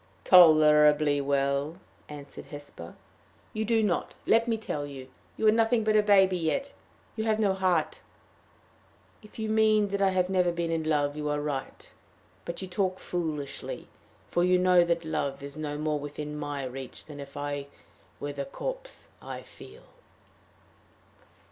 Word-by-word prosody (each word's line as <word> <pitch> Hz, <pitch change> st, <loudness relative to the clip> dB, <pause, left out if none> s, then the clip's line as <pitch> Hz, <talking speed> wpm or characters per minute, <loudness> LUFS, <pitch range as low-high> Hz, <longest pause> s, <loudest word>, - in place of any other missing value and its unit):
"Tolerably 150 Hz, -4 st, +6 dB
well," 140 Hz, +3 st, 0 dB, 0.3 s
answered 145 Hz, -2 st, -10 dB
Hesper. 145 Hz, -, -10 dB, 0.6 s
"You 220 Hz, -, -1 dB
do 225 Hz, 0 st, +2 dB
not 190 Hz, -5 st, -1 dB
let 230 Hz, +1 st, +3 dB
me 230 Hz, -1 st, +1 dB
tell 150 Hz, -9 st, -4 dB
you. 135 Hz, -2 st, -10 dB, 0.3 s
You -, -, -1 dB
are 215 Hz, -, +7 dB
nothing 225 Hz, +1 st, +2 dB
but 215 Hz, 0 st, +2 dB
a 215 Hz, -, +6 dB
baby 190 Hz, -3 st, +4 dB
yet. 270 Hz, -, -1 dB, 0.4 s
You 220 Hz, -, -2 dB
have 220 Hz, -1 st, +2 dB
no 205 Hz, -3 st, +2 dB
heart." 185 Hz, -4 st, 0 dB, 1.2 s
"If 210 Hz, -, -16 dB
you 220 Hz, -1 st, -3 dB
mean 215 Hz, -1 st, +3 dB
that 200 Hz, 0 st, -2 dB
I 195 Hz, -, +4 dB
have 185 Hz, -1 st, +1 dB
never 180 Hz, -2 st, +2 dB
been 170 Hz, -1 st, -2 dB
in 165 Hz, -1 st, -1 dB
love, 145 Hz, -2 st, +1 dB
you 150 Hz, 0 st, -3 dB
are 150 Hz, 0 st, 0 dB
right. 145 Hz, -2 st, -5 dB, 0.6 s
But 170 Hz, +3 st, -5 dB
you -, -, -5 dB
talk 185 Hz, 0 st, -1 dB
foolishly; 155 Hz, -5 st, -5 dB, 0.4 s
for 175 Hz, -, +2 dB
you 180 Hz, 0 st, +4 dB
know 180 Hz, -1 st, +5 dB
that 170 Hz, -1 st, -1 dB
love 140 Hz, -3 st, -3 dB
is 140 Hz, 0 st, -7 dB
no 150 Hz, -1 st, -4 dB
more 150 Hz, 0 st, -1 dB
within 150 Hz, +1 st, -6 dB
my 145 Hz, -2 st, -4 dB
reach 130 Hz, 0 st, -7 dB
than 150 Hz, -2 st, -10 dB
if 140 Hz, 0 st, -9 dB
I 145 Hz, -1 st, -4 dB, 0.5 s
were 145 Hz, 0 st, -4 dB
the 140 Hz, 0 st, -4 dB
corpse -, -, -7 dB
I -, -, -7 dB
feel." -, -, -14 dB
160 Hz, 160 wpm, -28 LUFS, 145-195 Hz, 1.2 s, are